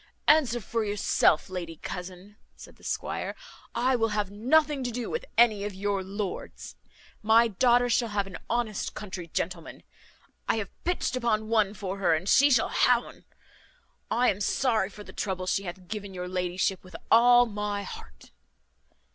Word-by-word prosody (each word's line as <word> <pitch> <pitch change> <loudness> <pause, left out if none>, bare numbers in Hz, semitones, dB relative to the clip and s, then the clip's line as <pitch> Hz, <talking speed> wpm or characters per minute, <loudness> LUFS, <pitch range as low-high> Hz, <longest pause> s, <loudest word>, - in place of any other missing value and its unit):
"Answer 275 -6 +4
for 230 +1 -2
yourself, 205 -6 +2
lady 175 -3 -6
cousin," 180 +5 -8 0.2
said - - -14
the - - -22
squire, - - -3 0.4
"I 255 +2 +2
will 225 -2 +2
have 205 -2 -1
nothing 280 +6 +2
to 245 - -2
do 240 0 -4
with 475 +1 -3
any 220 -4 +4
of 205 -2 -4
your 200 0 -1
lords. 195 0 -6 0.5
My 225 +2 +5
daughter 245 +4 +3
shall 235 -1 +1
have 205 -1 -1
an 195 -2 -9
honest 230 -3 -2
country 185 -5 -7
gentleman; 170 0 -4 0.7
I - - +3
have 215 -4 -4
pitched 355 -6 -1
upon 220 -3 0
one 215 -3 +2
for 195 -1 -5
her 175 -4 +3
and 170 +4 -4
she 280 +7 +6
shall 245 -5 +3
ha' 250 - +4
un. 240 - -11 0.8
I 245 +2 +3
am 200 - -6
sorry 220 -2 +1
for 210 +1 -11
the - - -13
trouble 185 -2 -3
she 195 +2 -1
hath 180 +1 -8
given 205 -2 -6
your 180 0 -5
ladyship 180 +1 -1
with 185 -2 -14 0.2
all 245 +2 +7
my 205 -2 -3
heart." 65 - -11
210 Hz, 170 wpm, -27 LUFS, 190-235 Hz, 0.8 s, all